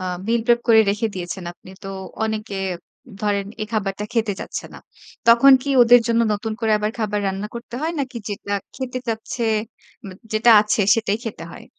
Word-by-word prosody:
আ -, -, -6 dB, 0.2 s
meal 230 Hz, 0 st, +1 dB
prep 240 Hz, -1 st, +4 dB
করে 220 Hz, -1 st, +7 dB
রেখে 210 Hz, +3 st, -1 dB
দিয়েছেন 180 Hz, 0 st, -5 dB
আপনি। 185 Hz, -, -16 dB
তো -, -, -5 dB, 0.4 s
অনেকে 215 Hz, -2 st, -4 dB, 0.7 s
ধরেন 200 Hz, -1 st, 0 dB, 0.2 s
এই 215 Hz, -, -3 dB
খাবারটা 205 Hz, -2 st, -2 dB
খেতে 225 Hz, -3 st, 0 dB
চাচ্ছে -, -, -5 dB
না। -, -, -9 dB, 0.5 s
তখন 240 Hz, +4 st, +8 dB
কি 280 Hz, -, -6 dB
ওদের 240 Hz, +1 st, +7 dB
জন্য 230 Hz, 0 st, +2 dB
নতুন 215 Hz, +2 st, -3 dB
করে 225 Hz, -1 st, 0 dB
আবার 210 Hz, +1 st, -1 dB
খাবার 210 Hz, -2 st, -1 dB
রান্না 195 Hz, +2 st, -3 dB
করতে 235 Hz, 0 st, -8 dB
হয় 330 Hz, +2 st, -1 dB
নাকি 260 Hz, -2 st, -5 dB
যেটা 205 Hz, 0 st, -5 dB, 0.2 s
খেতে 255 Hz, -1 st, -4 dB
চাচ্ছে, 225 Hz, +2 st, -3 dB, 0.6 s
ম -, -, -7 dB, 0.2 s
যেটা 220 Hz, +2 st, +4 dB
আছে 210 Hz, +1 st, 0 dB
সেটাই 215 Hz, -2 st, -1 dB
খেতে 205 Hz, -7 st, -6 dB
হয়? -, -, -11 dB
220 Hz, 185 wpm, -21 LUFS, 205-235 Hz, 0.7 s, তখন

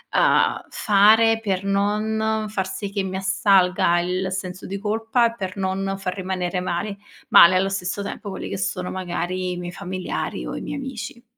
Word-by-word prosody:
uhm, -, -, +3 dB
fare 220 Hz, +2 st, +4 dB
per 195 Hz, -3 st, -1 dB
non 215 Hz, +2 st, 0 dB
far 190 Hz, -3 st, -2 dB
sì 195 Hz, +1 st, -5 dB
che 200 Hz, 0 st, -1 dB
mi 190 Hz, 0 st, -4 dB
assalga 190 Hz, -2 st, +3 dB
il 185 Hz, +2 st, -2 dB
senso 185 Hz, 0 st, -5 dB
di 195 Hz, -, -4 dB
colpa, 225 Hz, +3 st, +1 dB
per 190 Hz, -4 st, -6 dB
non 195 Hz, 0 st, -1 dB
far 185 Hz, -2 st, -3 dB
rimanere 185 Hz, -1 st, -2 dB
mal 180 Hz, +3 st, -2 dB, 0.3 s
male 175 Hz, +2 st, +8 dB
allo 190 Hz, +1 st, +2 dB
stesso 195 Hz, +1 st, -3 dB
tempo 200 Hz, +1 st, -6 dB
quelli 190 Hz, -, -6 dB
che 100 Hz, -, -4 dB
sono 180 Hz, -, -2 dB
magari 180 Hz, -2 st, -4 dB, 0.3 s
i -, -, -6 dB
miei 175 Hz, 0 st, -5 dB
familiari 185 Hz, -1 st, -4 dB
o -, -, -5 dB
i -, -, -4 dB
miei -, -, -5 dB
amici. 240 Hz, -3 st, -7 dB
195 Hz, 175 wpm, -23 LUFS, 185-210 Hz, 0.3 s, male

